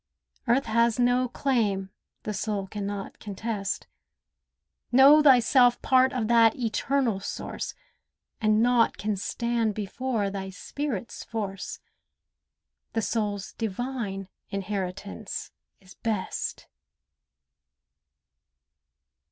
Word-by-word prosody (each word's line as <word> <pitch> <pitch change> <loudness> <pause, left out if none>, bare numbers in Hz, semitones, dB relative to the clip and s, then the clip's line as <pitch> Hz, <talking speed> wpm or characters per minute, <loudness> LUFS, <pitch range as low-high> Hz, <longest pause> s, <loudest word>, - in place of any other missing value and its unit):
Earth 245 +4 +3
has 230 +1 +2
no 245 +1 +3
claim 210 -8 0 0.3
the 215 - -3
soul 205 -1 -2
can 200 +1 -5
not 200 -1 -5
contest. 205 -1 -3 1.1
Know 275 +4 +8
thyself 250 -2 +5
part 260 0 +4
of 250 -5 -1
that 230 -1 +5
Eternal 235 0 0
Source, 195 - -5 0.7
And 215 0 +4
naught 240 -1 +3
can 210 0 -1
stand 230 +2 -1
before 215 0 -2
thy 195 -1 -4
spirit's 235 +3 -5
force. 205 -4 -5 1.1
The 225 - 0
soul's 205 -4 -2
divine 220 -3 -3 0.2
inheritance 195 +1 -4 0.3
is 190 -1 -16
best. 215 -4 -3
220 Hz, 95 wpm, -27 LUFS, 200-245 Hz, 1.1 s, Know